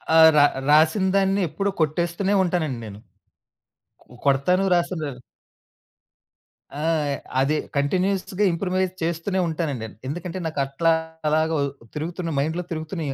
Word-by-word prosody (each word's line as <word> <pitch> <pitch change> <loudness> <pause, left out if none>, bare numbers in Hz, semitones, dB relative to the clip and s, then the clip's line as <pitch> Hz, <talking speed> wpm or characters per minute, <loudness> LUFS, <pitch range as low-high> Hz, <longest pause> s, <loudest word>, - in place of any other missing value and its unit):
ఆహ్, 160 0 +9
ర - - +8 0.3
రాసినదాన్ని 190 +5 +3
ఎప్పుడు 195 +6 -1
కొట్టేస్తూనే 170 +5 0
ఉంటానండి 160 -8 -1
నేను. 105 -1 -9 1.1
కొ - - -33 0.2
కొడతాను 160 +8 +3
రాసను 175 0 0 1.8
ఆ! - - -3 0.6
అది 150 +3 +2 0.2
కంటిన్యూయస్‌గా 185 +6 0
ఇంప్రూవైజ్ 185 +1 -1
చేస్తూనే 170 +3 -1
ఉంటానండి. 150 -8 -3 0.2
ఎందుకంటే 175 +4 -5
నాకట్లాగా 160 +2 0 0.5
తిరుగుతున్న 170 +3 -4
మైండ్‌లో 160 +5 -1
తిరుగుతునియి 155 -2 -4
165 Hz, 95 wpm, -23 LUFS, 155-185 Hz, 1.8 s, ఆహ్